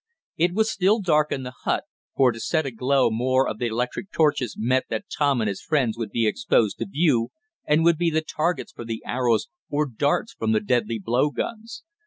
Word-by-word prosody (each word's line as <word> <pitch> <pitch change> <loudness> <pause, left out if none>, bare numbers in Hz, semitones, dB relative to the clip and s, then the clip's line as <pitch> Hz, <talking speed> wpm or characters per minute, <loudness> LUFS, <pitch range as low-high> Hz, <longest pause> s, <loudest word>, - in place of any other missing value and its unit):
It 175 +2 +1
was 220 +1 +2
still 200 +4 +2
dark 155 -6 +2
in 135 - -2
the 125 0 -7
hut, - - 0 0.3
for 130 -2 +4
to 115 - -8
set 160 +5 0
aglow 130 0 +1
more 130 +4 +2
of 110 - -4
the 120 - 0
electric 125 - -3
torches 145 -7 +1
meant 125 +4 +1
that 205 - -3
Tom 140 -5 +2
and 110 - 0
his 100 -2 -3
friends 130 -8 0
would 115 -2 -4
be 115 +2 0
exposed 110 0 +1
to - - -3
view, 145 -10 +1 0.4
and 150 +2 +3
would 170 -1 +4
be 175 -1 +2
the 160 0 0
targets 165 +3 -2
for - - -9
the 115 -1 -5
arrows, 120 -3 +1 0.2
or 150 +1 +1
darts 145 - -1
from 110 0 -1
the 110 - +3
deadly 115 0 0
blow 120 +7 +1
guns. 230 - -5
130 Hz, 210 wpm, -24 LUFS, 115-160 Hz, 0.4 s, for